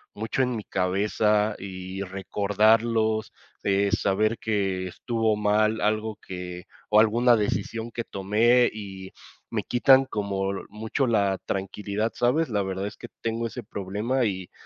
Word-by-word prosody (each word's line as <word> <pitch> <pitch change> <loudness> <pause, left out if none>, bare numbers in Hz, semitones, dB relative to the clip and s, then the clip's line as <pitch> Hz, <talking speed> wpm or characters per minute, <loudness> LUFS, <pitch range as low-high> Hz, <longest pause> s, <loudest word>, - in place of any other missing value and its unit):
mucho 110 +5 -1
en 125 -1 -1
mi 110 - -4
cabeza 105 +3 +1
y 95 0 -6
recordarlos, 110 +3 +1 0.3
eh, 100 +1 +2
saber 105 +2 +1
que 95 -4 -1
estuvo 115 +2 0
mal 105 +1 +2
algo, 110 0 0
que 90 -1 -7 0.2
o 105 - +6
alguna 120 +3 +5
decisión 110 +2 -2
que 115 0 -4
tomé, 110 +5 +3
y 95 -3 -8 0.4
me - - -2
quitan 130 +2 +5
como 100 -4 -2 0.2
mucho 110 +6 -2
la 100 -4 +2
tranquilidad, 100 +3 -2
¿sabes? 130 +6 +1
La 105 -3 0
verdad 95 0 -3
es 105 - -6
que - - -9
tengo 115 0 -1
ese 120 +1 -7
problema, 105 +6 -2
y 95 -3 -3
105 Hz, 140 wpm, -26 LUFS, 100-115 Hz, 0.4 s, o